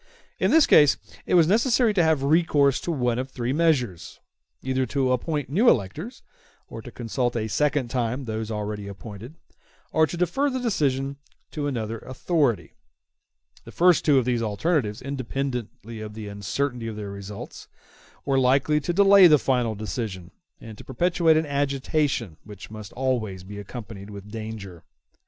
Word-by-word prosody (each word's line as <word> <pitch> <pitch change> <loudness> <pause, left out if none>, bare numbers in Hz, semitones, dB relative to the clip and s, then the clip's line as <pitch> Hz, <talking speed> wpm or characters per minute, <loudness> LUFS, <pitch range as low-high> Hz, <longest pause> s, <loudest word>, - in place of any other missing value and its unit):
In - - +2
this 320 -2 +6
case 145 -2 +6 0.3
it - - +2
was 170 -2 +6
necessary 230 +3 +3
to 190 - +3
have 160 -4 +2
recourse 145 -3 +3
to 175 - -3
one 125 -5 0
of 130 +1 -4
three 125 -1 -3
measures; 140 - 0 0.4
either 130 0 0
to 130 +1 0
appoint 145 +3 -1
new 210 - +4
electors, 155 - -1 0.4
or - - -8
to - - -10
consult 120 +1 -2
a 110 -2 -1
second 145 +1 0
time 125 +2 -2
those 110 -1 -4
already 105 -1 -4
appointed, 105 +6 -9 0.6
or 160 0 +3
to 175 - -6
defer 270 - +1
the 260 - -3
election 140 - -1 0.3
to 145 -2 -3
another 115 -4 -3
authority. 130 - -1 0.9
The - - -12
first 180 0 +4
two 145 -3 +4
of 130 - +2
these 120 -2 0
alternatives, 110 - -1
independently 125 -4 -5
of 105 -1 -8
the 110 -1 -7
uncertainty 115 +5 -3
of 110 - -5
their 105 -1 -6
results, 100 +1 -9 0.6
were 135 -1 +2
likely 135 +4 +3
to 175 +4 -2
delay 200 0 +7
the 155 -2 +6
final 125 -5 0
decision, 100 -3 -5 0.3
and 110 -2 -11
to - - -10
perpetuate 165 +3 +2
an 160 - +1
agitation 140 - -1
which 105 0 -11
must 110 -2 -9
always 115 -8 -2
be 100 +2 -9
accompanied 105 -1 -9
with 100 0 -10
danger. 110 -6 -7
130 Hz, 160 wpm, -25 LUFS, 110-150 Hz, 0.9 s, delay